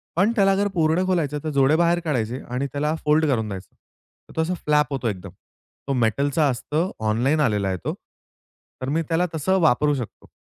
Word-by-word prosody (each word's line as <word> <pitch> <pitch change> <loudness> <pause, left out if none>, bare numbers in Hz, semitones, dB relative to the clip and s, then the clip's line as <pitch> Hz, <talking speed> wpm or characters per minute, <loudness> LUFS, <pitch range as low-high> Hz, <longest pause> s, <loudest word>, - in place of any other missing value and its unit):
पण 195 +7 +3
त्याला 195 -2 +4
अगर 200 +1 +1
पूर्ण 165 +2 +2
खोलायचं 155 -6 0
तर 155 - -2
जोडे 135 +3 +4
बाहेर 170 0 +3
काढायचे 125 -4 -1
आणि 130 +3 -2
त्याला 150 +2 0
फोल्ड 155 +1 +3
करून 115 -6 0
द्यायचं. 95 -1 -8 0.5
तर - - -15
तो 160 - +1
असा 175 +3 -1
फ्लॅप 150 -1 +2
होतो 130 -3 -2
एकदम. 95 -2 -6 0.6
तो 140 - 0
मेटलचा 140 +6 +1
असतो 150 +8 -1 0.2
ऑनलाइन 130 +8 +1
आलेला 105 -7 +1
आहे 95 - -1
तो. - - -1 0.9
तर 130 - -3
मी 160 +4 +1
त्याला 170 +2 +2
तसं 190 +5 +1
वापरू 150 0 +3
शकतो. 125 -5 -7
150 Hz, 190 wpm, -23 LUFS, 125-160 Hz, 0.9 s, त्याला